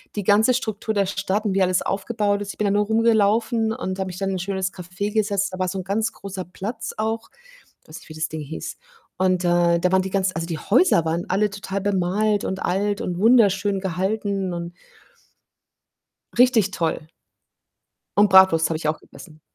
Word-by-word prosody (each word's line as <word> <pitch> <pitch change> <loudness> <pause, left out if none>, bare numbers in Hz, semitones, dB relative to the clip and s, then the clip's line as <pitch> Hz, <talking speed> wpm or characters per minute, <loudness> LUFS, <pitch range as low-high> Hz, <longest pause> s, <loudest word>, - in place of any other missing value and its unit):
die 205 - -2
ganze 210 +6 +4
Struktur 220 -3 -2
der 200 -2 +2
Stadt 195 +1 -1
und 200 - 0
wie 195 - +1
alles 185 -1 +2
aufgebaut 205 0 -1
ist 200 -1 -4
ich - - -21
bin 210 - +1
da 200 - +2
nur 205 +1 +2
rumgelaufen 225 +1 +2
und 190 -3 -5
habe 190 - -2
mich 180 -1 -7
dann 195 -1 -1
in 190 - -2
ein - - -3
schönes 190 0 -2
Café 180 +3 -5
gesetzt. 200 -3 0
Da 185 - -6
war 185 - 0
so 190 +2 -3
'n - - -5
ganz 205 +4 -1
großer 195 -2 -7
Platz 210 +6 -6
auch. 225 +1 -2 0.6
Weiß 155 - -10
nicht, - - -18
wie 155 - -10
das 155 0 -2
Ding 155 - -6
hieß. 150 +2 -7 0.4
Und, 185 -1 +1
äh, 175 -1 +3
da 180 +2 0
waren 190 0 +4
die 190 - -5
ganz 190 -1 0
also, 165 +1 -3
die 165 -2 -4
Häuser 215 - +3
waren 165 +2 -2
alle 205 +3 +1
total 195 0 -5
bemalt 205 +2 0
und 190 0 -3
alt 200 +3 -1
und 175 -1 -3
wunderschön 205 -3 +3
gehalten 190 +1 -2
und 170 0 -5 1.7
Richtig 235 -5 +4
toll. 165 -4 -2 1.1
Und 205 0 +5
Bratwurst 190 -4 +6
habe 160 - -1
ich 155 - -4
auch 155 0 -1
gegessen. 155 -3 -15
195 Hz, 200 wpm, -22 LUFS, 180-210 Hz, 1.7 s, Bratwurst